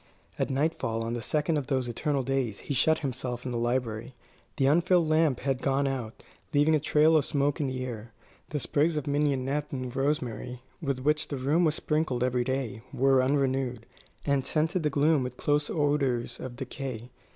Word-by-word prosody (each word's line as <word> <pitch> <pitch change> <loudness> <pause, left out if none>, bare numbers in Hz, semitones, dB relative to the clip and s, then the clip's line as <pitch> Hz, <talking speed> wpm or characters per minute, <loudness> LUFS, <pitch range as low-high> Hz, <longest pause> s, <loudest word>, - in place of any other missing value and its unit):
At - - 0
nightfall 135 -5 0
on 115 +1 -3
the 120 - -3
second 150 +6 0
of 140 -3 -3
those 130 -3 0
eternal 135 +3 -1
days 130 -5 -1
he - - -3
shut 160 +5 +3
himself 125 -1 -4
in 125 - -2
the 120 - -2
library. 120 0 -2 0.4
The 135 - +2
unfilled 170 +3 +4
lamp 155 -4 +2
had 135 -1 -1
gone 135 +1 +1
out, 125 -5 -4 0.3
leaving 145 +2 +4
a 155 - +4
trail 155 +2 +4
of 155 - +4
smoke 145 0 0
in 140 - 0
the 130 -1 -3
air. 115 -2 -7 0.4
The 150 - -2
sprigs 150 +4 +1
of 150 - -2
mignonette 145 0 0
and 130 -2 -4
rosemary, 125 -3 -2 0.2
with 140 -4 -2
which 150 +3 +1
the 140 - -4
room 145 +7 +2
was 155 -1 +2
sprinkled 150 -7 0
every 125 -1 +1
day, 130 -3 -2
were 135 0 +4
unrenewed, 130 -3 0 0.4
and 140 -2 +2
scented 160 +6 0
the 150 - +1
gloom 150 +1 +3
with 125 0 -4
close 145 0 +1
odours 145 -5 0
of 130 -1 -6
decay. 130 -2 -6
135 Hz, 185 wpm, -28 LUFS, 125-150 Hz, 0.4 s, unfilled